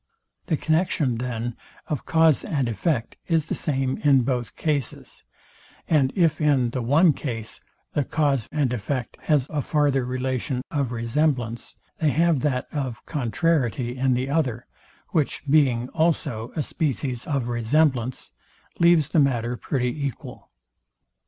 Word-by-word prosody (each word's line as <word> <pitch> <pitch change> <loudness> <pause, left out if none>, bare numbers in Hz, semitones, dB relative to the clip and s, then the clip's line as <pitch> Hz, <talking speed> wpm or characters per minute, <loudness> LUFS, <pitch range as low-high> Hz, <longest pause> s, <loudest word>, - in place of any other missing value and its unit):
The 155 - +1
connexion, 155 -6 +1
then, 120 -1 -3 0.3
of 150 -5 -4
cause 160 -3 +4
and 140 -6 -1
effect 115 - -1
is 165 -3 +2
the - - -3
same 135 -3 -1
in 135 -4 +4
both 125 -2 -2
cases; 145 -5 -3 0.6
and 140 -5 +3
if 165 -5 +2
in 135 -5 +3
the 130 - -2
one 150 +7 +4
case, 115 -7 -6 0.3
the 145 - +1
cause 140 -6 0
and 140 -5 0
effect 125 +2 -3
have 150 -5 +2
a 150 -2 0
farther 145 -3 +1
relation 130 0 -2
of 140 -5 -1
resemblance, 120 0 -1 0.2
they 155 - +3
have 165 0 +2
that 130 -2 0
of 130 -6 -4
contrariety 125 -2 0
in 130 -1 +2
the 130 +2 -1
other; 135 -5 -1 0.4
which, 155 -5 0
being 135 -5 +3
also 145 -8 0
a 155 - 0
species 135 -6 -2
of 140 -5 -1
resemblance, 125 +1 +1 0.5
leaves 170 -4 +5
the 160 - +2
matter 125 -4 +1
pretty 125 -1 -2
equal. 130 - -9
135 Hz, 140 wpm, -24 LUFS, 120-150 Hz, 0.6 s, leaves